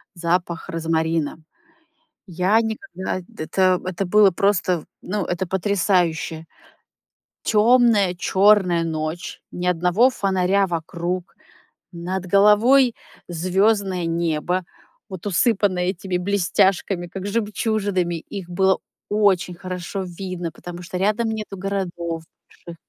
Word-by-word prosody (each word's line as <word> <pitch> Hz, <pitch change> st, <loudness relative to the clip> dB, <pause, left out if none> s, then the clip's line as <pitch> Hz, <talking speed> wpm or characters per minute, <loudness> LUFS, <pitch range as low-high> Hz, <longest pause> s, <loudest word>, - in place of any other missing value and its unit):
запах 170 Hz, 0 st, -1 dB
розмарина. 160 Hz, -2 st, -1 dB, 0.9 s
Я 185 Hz, +5 st, +2 dB
никогда 220 Hz, -5 st, -4 dB, 0.2 s
это 185 Hz, +2 st, +2 dB
это 185 Hz, +1 st, -2 dB
было 205 Hz, +2 st, +5 dB
просто, 180 Hz, -3 st, +1 dB, 0.2 s
ну, 200 Hz, +2 st, -2 dB
это 175 Hz, +1 st, -2 dB
потрясающе. 180 Hz, -4 st, 0 dB, 1.0 s
Тёмная, 220 Hz, -4 st, +4 dB
чёрная 190 Hz, -2 st, +3 dB
ночь, 160 Hz, +1 st, -4 dB
ни 180 Hz, -, -5 dB
одного 180 Hz, +7 st, +3 dB
фонаря 195 Hz, -2 st, +1 dB
вокруг. 170 Hz, +1 st, -4 dB, 0.6 s
Над 180 Hz, +2 st, -4 dB
головой 220 Hz, +7 st, +5 dB, 0.3 s
звёздное 185 Hz, +1 st, +1 dB
небо, 170 Hz, +2 st, -1 dB, 0.5 s
вот 185 Hz, -2 st, -8 dB
усыпанное 195 Hz, -2 st, +2 dB
этими 185 Hz, 0 st, -2 dB
блестяшками, 190 Hz, -1 st, +1 dB
как 190 Hz, +2 st, -7 dB
жемчужинами, 205 Hz, -4 st, -1 dB
их 180 Hz, +2 st, -8 dB
было 190 Hz, +2 st, +2 dB, 0.3 s
очень 200 Hz, -4 st, +2 dB
хорошо 185 Hz, +2 st, -5 dB, 0.2 s
видно, 180 Hz, -3 st, -4 dB
потому 175 Hz, +2 st, -9 dB
что 180 Hz, +1 st, -5 dB
рядом 210 Hz, +4 st, +1 dB
нету 215 Hz, -3 st, -5 dB
городов 175 Hz, -4 st, -3 dB, 0.4 s
больших. 170 Hz, -, -7 dB
185 Hz, 100 wpm, -22 LUFS, 175-200 Hz, 1.0 s, было